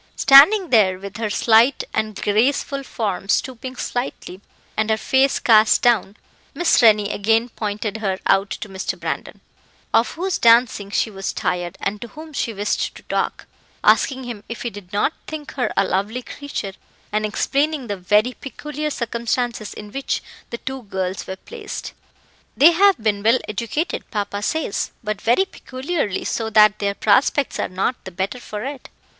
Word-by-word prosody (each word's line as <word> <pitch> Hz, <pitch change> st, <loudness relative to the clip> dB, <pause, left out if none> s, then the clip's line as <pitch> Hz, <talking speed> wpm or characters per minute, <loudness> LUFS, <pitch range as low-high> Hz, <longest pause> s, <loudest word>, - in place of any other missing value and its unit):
Standing 335 Hz, +8 st, +7 dB
there, 195 Hz, -6 st, +4 dB
with 200 Hz, +1 st, -8 dB
her 220 Hz, -1 st, -2 dB
slight 230 Hz, +5 st, +4 dB
and 215 Hz, -2 st, -2 dB
graceful 265 Hz, +6 st, +1 dB
form 205 Hz, -7 st, -4 dB
stooping 255 Hz, +3 st, -1 dB
slightly, 245 Hz, -7 st, -5 dB, 0.3 s
and 220 Hz, 0 st, 0 dB
her 220 Hz, -, +2 dB
face 265 Hz, +4 st, +2 dB
cast 220 Hz, -2 st, +4 dB
down, 220 Hz, -4 st, +2 dB, 0.4 s
Miss 350 Hz, -5 st, +3 dB
Rennie 210 Hz, -3 st, +5 dB
again 225 Hz, +3 st, +1 dB
pointed 210 Hz, -1 st, -4 dB
her 195 Hz, -4 st, -1 dB
out 195 Hz, +1 st, +3 dB
to -, -, -5 dB
Mr. 190 Hz, -1 st, -4 dB
Brandon, -, -, -5 dB, 0.5 s
of 230 Hz, -, +4 dB
whose 370 Hz, +2 st, -2 dB
dancing 230 Hz, -3 st, +4 dB
she 215 Hz, +2 st, 0 dB
was 195 Hz, -1 st, -4 dB
tired, 175 Hz, -1 st, -2 dB
and 205 Hz, +1 st, -3 dB
to 235 Hz, -, -6 dB
whom 310 Hz, +5 st, -11 dB
she 235 Hz, -, -1 dB
wished 205 Hz, -1 st, -2 dB
to -, -, -13 dB
talk, -, -, -2 dB, 0.4 s
asking 265 Hz, -1 st, +3 dB
him 235 Hz, -4 st, -7 dB
if 230 Hz, -, -6 dB
he 240 Hz, -, -3 dB
did 195 Hz, -3 st, -11 dB
not 205 Hz, +9 st, +1 dB
think 305 Hz, -2 st, -7 dB
her 250 Hz, -5 st, -1 dB
a -, -, +4 dB
lovely 210 Hz, +7 st, -2 dB
creature, 280 Hz, -10 st, -6 dB, 0.4 s
and 215 Hz, +1 st, 0 dB
explaining 280 Hz, +6 st, 0 dB
the 205 Hz, -3 st, -3 dB
very 210 Hz, +6 st, +2 dB
peculiar 300 Hz, +4 st, -5 dB
circumstances 235 Hz, -3 st, -2 dB
in 210 Hz, -1 st, -9 dB
which 275 Hz, +3 st, -3 dB, 0.3 s
the 235 Hz, -, -5 dB
two 265 Hz, +2 st, -6 dB
girls 190 Hz, -3 st, -4 dB
were 190 Hz, -, -4 dB
placed. 435 Hz, -, -8 dB, 0.6 s
"They 315 Hz, +5 st, +8 dB
have 390 Hz, +3 st, +4 dB
been 215 Hz, -2 st, 0 dB
well 225 Hz, +4 st, +4 dB
educated, 235 Hz, -, -3 dB
papa 205 Hz, -2 st, -3 dB
says, 315 Hz, -1 st, -1 dB
but 210 Hz, -2 st, -3 dB
very 240 Hz, +12 st, +3 dB
peculiarly, 265 Hz, -, -3 dB
so 225 Hz, -1 st, -2 dB
that 215 Hz, -1 st, +5 dB
their 200 Hz, -1 st, -1 dB
prospects 255 Hz, +7 st, +2 dB
are -, -, -1 dB
not 190 Hz, +7 st, -2 dB
the -, -, -5 dB
better 190 Hz, +7 st, -3 dB
for 210 Hz, -2 st, -6 dB
it. 275 Hz, -1 st, -7 dB
225 Hz, 165 wpm, -21 LUFS, 205-265 Hz, 0.6 s, They